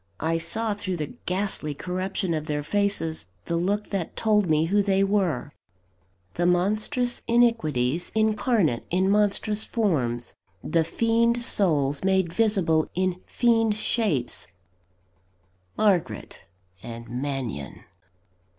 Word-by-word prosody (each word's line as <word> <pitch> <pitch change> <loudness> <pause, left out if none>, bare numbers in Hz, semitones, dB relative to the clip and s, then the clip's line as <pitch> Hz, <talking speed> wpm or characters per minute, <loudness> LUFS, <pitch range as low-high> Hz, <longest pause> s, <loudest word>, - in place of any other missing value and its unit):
I 165 +1 +1
saw 220 +5 -1
through 190 -3 -4
the 150 -3 -5
ghastly 180 -5 -2
corruption 185 +1 -2
of 155 -1 -3
their 150 -1 -2
faces 195 - 0 0.2
the 170 - -2
look 200 +5 -1
that 190 -5 -3
told 210 -4 +2
me 155 0 +3
who 205 +5 +2
they 195 -1 +2
were 190 -9 0 0.8
the 175 +1 0
monstrous 215 +8 +1
iniquities 175 - +2
incarnate 215 - +2
in 185 +2 +2
monstrous 210 +1 +1
forms; 130 - 0 0.3
the 165 +1 +2
fiend 230 +6 +1
souls 145 -10 +2
made 190 -3 +1
visible 185 -8 +2
in 185 0 -1
fiend 225 -3 +2
shapes 190 - 0 1.3
Margaret 175 - 0 0.4
and 115 0 -8
Mannion! 125 - -4
185 Hz, 115 wpm, -25 LUFS, 155-210 Hz, 1.3 s, me